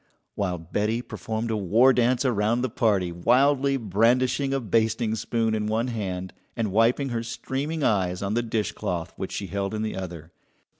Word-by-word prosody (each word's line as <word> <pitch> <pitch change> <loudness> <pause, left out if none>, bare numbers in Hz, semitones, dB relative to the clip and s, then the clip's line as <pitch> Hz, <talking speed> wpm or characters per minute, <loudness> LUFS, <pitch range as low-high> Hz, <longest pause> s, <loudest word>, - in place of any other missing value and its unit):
while 95 -3 -1
Betty 105 +8 -2
performed 115 -2 -4
a - - 0
war 110 +7 +4
dance 125 +2 +2
around 115 0 +1
the 130 - -1
party, 100 -7 +1
wildly 135 +9 +3
brandishing 125 +5 +2
a 135 - +1
basting 115 0 +1
spoon 115 0 -1
in 105 -1 -1
one 115 +3 0
hand 95 -6 -4 0.2
and 110 -3 -1
wiping 115 +6 +2
her 115 -2 -2
streaming 140 +6 -3
eyes 95 -5 +1
on 100 +1 -1
the 120 - +2
dishcloth 105 -7 -3
which - - -5
she 100 - -3
held 100 +2 -3
in 110 - -2
the 110 - -3
other. 85 -3 -7
110 Hz, 170 wpm, -25 LUFS, 100-125 Hz, 0.2 s, war